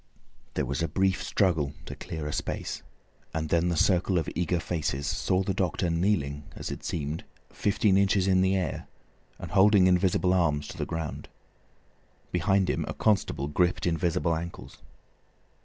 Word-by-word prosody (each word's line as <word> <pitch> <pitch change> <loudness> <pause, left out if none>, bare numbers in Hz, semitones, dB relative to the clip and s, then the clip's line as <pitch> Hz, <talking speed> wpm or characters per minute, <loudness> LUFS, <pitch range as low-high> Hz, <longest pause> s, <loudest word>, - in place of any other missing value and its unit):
There - - 0
was 70 +5 -2
a 85 - +1
brief 95 +4 +1
struggle 80 -8 +1
to - - -6
clear 80 -2 -6
a 75 - -3
space, - - -3 0.5
and 80 -1 -2
then 85 +2 +2
the 85 - -1
circle 90 +1 +3
of 80 - 0
eager 90 0 0
faces 75 -4 -2
saw 95 +1 0
the 95 - -1
doctor 90 -2 0
kneeling, 85 -5 0
as - - -5
it - - -7
seemed, 75 0 -3 0.3
fifteen 100 -1 +2
inches 100 -1 +3
in 95 -1 +4
the 95 +1 +3
air, 90 -6 -2 0.5
and - - -8
holding 100 -1 +6
invisible 90 0 +3
arms 75 -5 +1
to - - -8
the - - -2
ground. 80 -2 -5 1.0
Behind 95 +2 +2
him - - 0
a - - -4
constable 95 -9 +1
gripped 85 +4 +1
invisible 85 -1 +1
ankles. 85 +1 -7
90 Hz, 160 wpm, -28 LUFS, 80-95 Hz, 1.0 s, holding